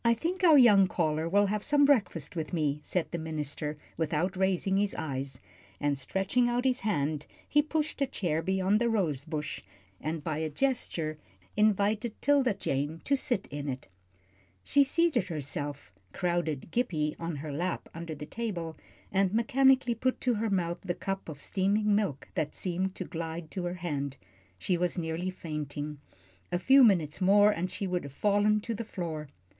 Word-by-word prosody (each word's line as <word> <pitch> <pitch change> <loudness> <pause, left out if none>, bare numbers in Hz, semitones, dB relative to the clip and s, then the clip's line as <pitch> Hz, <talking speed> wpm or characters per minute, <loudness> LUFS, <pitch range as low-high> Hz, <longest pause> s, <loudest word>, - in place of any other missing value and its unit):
"I 235 0 +4
think 360 - -3
our 320 -4 +8
young 205 -7 +7
caller 160 -2 0
will 205 +3 +4
have 205 +1 -1
some 290 -1 +5
breakfast 195 - +1
with 160 +1 -4
me," 150 -3 0
said 175 +3 -2
the 170 - -2
minister, 150 -1 -3 0.2
without 160 +3 0
raising 190 0 +1
his 205 0 +1
eyes, 135 -4 -4 0.4
and 145 -1 +1
stretching 195 - 0
out 245 +1 0
his 255 -1 +2
hand 155 -7 -1 0.2
he 295 - +4
pushed 310 0 -2
a 275 - +3
chair 170 - -1
beyond 190 +4 +1
the 235 - +3
rose 160 - 0
bush, 150 -3 -4 0.4
and 155 0 -3
by 155 -1 -2
a 160 0 -1
gesture 160 - -1 0.4
invited 215 +2 +2
'Tilda 275 -6 +3
Jane 145 -3 -2
to 280 - +2
sit 245 -6 -1
in 145 0 -4
it. 130 -4 -5 0.8
She 285 - +4
seated 285 - +2
herself, 145 - -5 0.2
crowded 170 -4 -1
Gippie 155 -11 0
on 165 -1 -3
her 145 +1 -5
lap 175 +5 -2
under 165 -1 -6
the 150 +1 -7
table, 170 -5 -4 0.3
and 195 -1 +2
mechanically 255 +3 +4
put 255 +3 -1
to 250 - +2
her 220 0 -1
mouth 175 -3 -1
the 175 -2 -3
cup 195 -2 -4
of 145 -3 -8
steaming 205 +5 +1
milk 200 -10 0
that 155 - -2
seemed 185 +1 -1
to 185 - -5
glide 165 -1 -5
to 185 -2 -3
her 175 +1 -2
hand. 140 -6 -3 0.4
She 175 - 0
was 180 +2 -1
nearly 165 +2 -2
fainting. 150 -4 -5 0.5
A - - +2
few 265 +8 +6
minutes 175 -8 +3
more, 205 +2 +6
and 180 -1 -2
she 195 - -4
would 180 -1 -1
have 140 - -8
fallen 205 +6 +2
to 230 - -3
the 230 - -4
floor. 165 -8 -5
180 Hz, 175 wpm, -30 LUFS, 155-215 Hz, 0.8 s, our